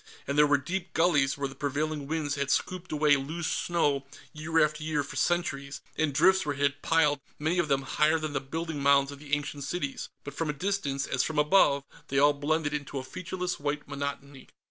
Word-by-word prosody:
And 140 - -2
there 150 0 +6
were 145 0 +4
deep 175 +7 -4
gullies 150 -6 +3
where 140 -1 -1
the 135 - -10
prevailing 145 +1 -2
winds 155 -2 -1
had 140 -1 -2
scooped 185 +3 -1
away 150 -1 +4
loose 160 +5 -4
snow 145 -7 0 0.3
year 155 +1 +2
after 150 0 -5
year 155 -2 0
for 140 - -9
centuries, 140 -5 -1 0.2
and 155 -1 +1
drifts 190 +7 +4
where 145 -1 -2
it - - -9
had 140 0 +1
piled, 150 -3 +3 0.2
many 160 +4 0
of 170 - +1
them 135 -1 +1
higher 155 +4 +2
than 155 -2 -4
the 135 - -1
building 160 +2 -4
mounds 140 0 +4
of 140 - -10
the 145 0 0
ancient 145 -1 -5
cities. 140 -1 -3
But 145 - -7
from 160 +1 -2
a - - 0
distance, 145 -5 -1
as 130 - 0
from 160 +2 -2
above, 150 -2 +4 0.2
they 135 - -2
all 145 +1 +6
blended 145 +1 -1
into 145 -1 -4
a 130 - -3
featureless 180 +6 -4
white 145 0 -3
monotony. 140 -1 -6
145 Hz, 210 wpm, -28 LUFS, 140-160 Hz, 0.3 s, there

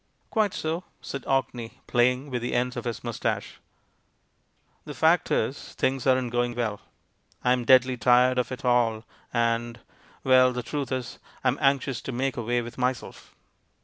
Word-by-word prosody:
"Quite 215 -4 +1
so," 160 +3 -2 0.2
said 140 - -7
Orkney, 125 -4 -1
playing 125 +3 +1
with 125 -1 -2
the 120 - -2
ends 125 +1 0
of - - -5
his 120 -2 -4
moustache. 120 -2 -3 1.2
"The - - -8
fact - - +3
is, - - -2
things 135 0 0
aren't 130 -2 +2
going 120 0 0
well; 110 -4 -2 0.6
I'm 125 -1 +2
deadly 130 0 +5
tired 125 +2 +4
of 125 0 -1
it 130 - -6
all, 115 -3 +2 0.3
and 115 0 0 0.4
Well, 130 -1 +5
the 125 0 -3
truth 140 +1 -4
is, 130 -2 -4 0.2
I'm 130 +1 +1
anxious 135 -2 +1
to - - -5
make 130 +2 -1
away 120 +1 -1
with 120 +2 -9
myself." 125 -1 -3
125 Hz, 155 wpm, -26 LUFS, 120-130 Hz, 1.2 s, deadly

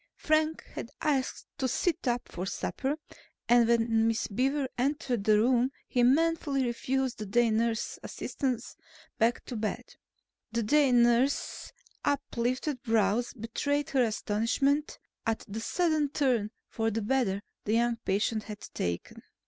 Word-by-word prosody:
Frank 310 0 +1
had 230 - -6
asked 275 -4 0
to 260 - +1
sit 290 +3 0
up 245 0 0
for 180 +2 -5
supper 270 +7 -2 0.5
and 240 -1 +5
when 225 -1 +3
Miss 225 0 0
Beaver 270 +6 0
entered 250 -4 -1
the 215 -1 +5
room 250 +3 +3 0.2
he 245 - +1
manfully 285 0 +3
refused 255 +1 -1
the 210 - -4
day 235 +3 +3
nurse's 225 +1 0
assistance 250 -3 -3 0.4
back 230 +2 +2
to 245 - -6
bed. 215 -1 -3 0.6
The 235 0 +1
day 285 +4 +4
nurse's 240 +3 +2 0.3
up 285 -1 +1
lifted 250 +3 -1
brows 225 -1 +1
betrayed 285 +5 -2
her 270 - +3
astonishment 235 +6 +1 0.3
at 225 -1 -1
the 210 +2 -5
sudden 310 +1 +1
turn 255 -7 +1 0.2
for 225 -1 -1
the 225 0 -2
better 205 -4 +1 0.2
the 215 - 0
young 235 0 +2
patient 215 +1 -1
had 210 -1 -8
taken. 85 0 -3
240 Hz, 140 wpm, -29 LUFS, 225-275 Hz, 0.6 s, and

